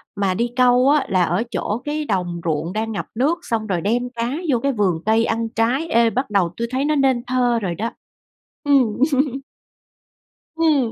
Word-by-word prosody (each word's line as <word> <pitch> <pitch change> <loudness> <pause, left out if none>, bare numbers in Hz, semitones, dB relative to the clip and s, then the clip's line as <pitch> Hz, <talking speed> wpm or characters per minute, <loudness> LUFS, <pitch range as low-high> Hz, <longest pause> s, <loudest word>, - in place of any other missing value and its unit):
mà 200 -2 0
đi 235 +5 -1
câu 250 +1 +4
á, 295 -1 +3
là 185 -2 +3
ở 175 +7 0
chỗ 220 +4 -2
cái 300 +1 -2
đồng 180 -5 -2
ruộng 165 +3 -1
đang 220 +1 -2
ngập 210 - -4
nước, 295 +9 +1
xong 225 -8 -2
rồi 180 -4 -1
đem 240 +4 0
cá 235 +2 -2 0.2
vô 245 - +3
cái 275 +3 0
vườn 190 -8 0
cây 225 +1 +3
ăn 225 0 -1
trái. 245 +9 0
Ê, 235 -5 +3
bắt 260 +2 -2
đầu 195 -5 +2
tui 235 0 -2
thấy 265 +2 0
nó 305 +1 +1
nên 265 -4 +2
thơ 245 -2 +1
rồi 175 -3 -2
đó. 225 +7 -3 0.7
Ừm 270 -6 +3 1.6
Ừm. 300 -8 +2
230 Hz, 190 wpm, -21 LUFS, 205-260 Hz, 1.6 s, câu